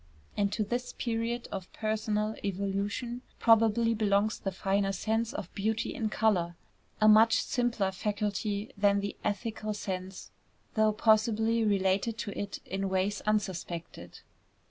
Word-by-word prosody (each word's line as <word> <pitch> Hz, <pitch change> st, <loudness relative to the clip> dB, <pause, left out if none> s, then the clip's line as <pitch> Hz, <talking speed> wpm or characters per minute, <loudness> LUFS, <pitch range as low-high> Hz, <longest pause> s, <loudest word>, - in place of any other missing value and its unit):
And 200 Hz, -1 st, +1 dB
to 220 Hz, -, 0 dB
this 245 Hz, +4 st, -3 dB
period 235 Hz, 0 st, -2 dB
of 190 Hz, -2 st, -6 dB
personal 215 Hz, 0 st, -1 dB
evolution 200 Hz, +5 st, -2 dB, 0.2 s
probably 230 Hz, 0 st, +4 dB
belongs 210 Hz, -1 st, +1 dB
the 195 Hz, -, -3 dB
finer 195 Hz, +1 st, 0 dB
sense 225 Hz, +4 st, -1 dB
of 180 Hz, -, -6 dB
beauty 220 Hz, +2 st, -1 dB
in 220 Hz, -2 st, -2 dB
color, 185 Hz, -7 st, +1 dB, 0.4 s
a 215 Hz, -, +5 dB
much 220 Hz, +1 st, +6 dB
simpler 240 Hz, -6 st, 0 dB
faculty 205 Hz, +1 st, -2 dB
than 200 Hz, -1 st, +3 dB
the 200 Hz, 0 st, -4 dB
ethical 215 Hz, 0 st, -2 dB
sense, 190 Hz, -2 st, -5 dB, 0.4 s
though 215 Hz, -1 st, +3 dB
possibly 220 Hz, +1 st, +3 dB
related 200 Hz, +2 st, +1 dB
to 205 Hz, -, -4 dB
it 200 Hz, -1 st, -5 dB
in 195 Hz, +1 st, -2 dB
ways 190 Hz, +2 st, 0 dB
unsuspected. 175 Hz, -, -3 dB
210 Hz, 130 wpm, -30 LUFS, 195-220 Hz, 0.4 s, much